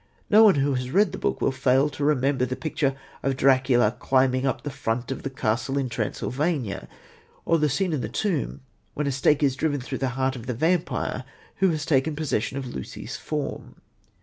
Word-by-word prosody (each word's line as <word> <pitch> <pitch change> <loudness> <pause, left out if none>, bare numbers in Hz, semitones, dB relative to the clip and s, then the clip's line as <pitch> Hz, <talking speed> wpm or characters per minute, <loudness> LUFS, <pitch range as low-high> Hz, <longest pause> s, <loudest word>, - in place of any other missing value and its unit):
No 215 +2 +8
one 210 -4 +7
who 140 0 +1
has 125 -1 -2
read 195 +4 +3
the - - -6
book - - -1
will - - +2
fail 130 +1 +3
to 145 0 -5
remember 140 -2 +2
the 130 0 -1
picture 140 -1 -1 0.3
of 135 -1 -1
Dracula 130 -4 +3
climbing 130 0 +2
up 130 - -2
the 145 - -4
front 115 +1 -2
of 135 - -4
the 135 - -3
castle 125 +1 -1
in 135 -2 0
Transylvania, 125 - -2 0.6
or 165 -1 +3
the 150 0 +2
scene 180 +5 0
in 145 - -1
the - - -4
tomb 165 - -2 0.3
when 150 - -1
a 140 - 0
stake 140 +3 +2
is 135 -2 +3
driven 145 0 0
through 125 - -5
the 135 - 0
heart 130 0 +1
of 120 -1 -9
the 125 - -2
vampire 160 -3 0 0.3
who 190 0 +3
has 155 -3 -2
taken 145 +1 +2
possession 140 -4 -1
of 135 - -4
Lucy's 65 - -7
form. 150 -2 -5
135 Hz, 200 wpm, -25 LUFS, 130-150 Hz, 0.6 s, No